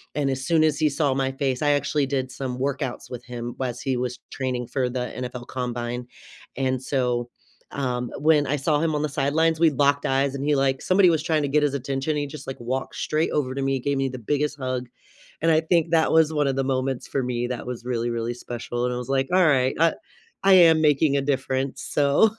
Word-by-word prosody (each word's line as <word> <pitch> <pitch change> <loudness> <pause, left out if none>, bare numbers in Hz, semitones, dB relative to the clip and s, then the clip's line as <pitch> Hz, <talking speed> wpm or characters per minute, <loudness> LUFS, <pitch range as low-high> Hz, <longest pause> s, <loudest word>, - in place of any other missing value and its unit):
and 140 -2 0
as 130 0 -3
soon 165 -2 +4
as 155 -1 +2
he 155 -1 +3
saw 140 -1 +1
my 135 0 0
face 135 -2 -2
I 145 -1 +3
actually 145 0 +1
did 130 -2 -2
some 130 -2 -4
workouts 135 -1 -3
with 125 -1 -7
him 120 -1 -6
whilst 125 0 -3
he 130 -2 0
was 125 -1 -3
training 125 -3 -3
for 125 -1 -1
the 125 0 -3
NFL 125 -1 -5
Combine, 120 -1 -4 0.5
and 130 -1 -1
so, 125 -3 -1 0.4
um, 125 -3 -2
when 150 -1 +3
I 145 - +1
saw 145 +2 +1
him 160 -1 0
on 150 - 0
the 150 - -1
sidelines, 155 +3 +1
we 165 -1 +6
locked 140 0 +2
eyes 135 +1 +1
and 140 - -4
he 150 0 +3
like 135 -1 +1
somebody 185 0 +4
was 160 -2 +1
trying 160 -1 +1
to - - 0
get 150 +2 +3
his 145 -2 +1
attention, 135 +2 -2
and 150 - 0
he 145 - -1
just, 140 -1 -10
like, 135 - -6
walked 130 +3 -3
straight 155 +1 0
over 135 -4 -1
to 135 - -2
me, 135 0 0
gave 140 +2 -1
me 135 0 0
the 130 - -6
biggest 145 +5 -1
hug, 130 -2 -3 0.5
and 165 +1 +3
I 155 - +5
think 165 0 +1
that 160 -1 +3
was 160 -1 +4
one 150 -2 +1
of 135 - 0
the 135 - 0
moments 130 -1 -1
for 135 - -1
me 120 -1 -2
that 125 0 -5
was 125 -1 -6
really, 120 -1 -1
really 115 0 -2
special, 120 0 -4
and 125 - -1
I - - -3
was 125 +1 -6
like, 135 0 +1
"Alright, 145 -8 +4
I 165 0 +4 0.5
I 195 - +6
am 165 -4 +7
making 150 -1 +3
a - - +1
difference, 135 -1 -2
so" 145 +9 +3
135 Hz, 235 wpm, -24 LUFS, 125-150 Hz, 0.5 s, am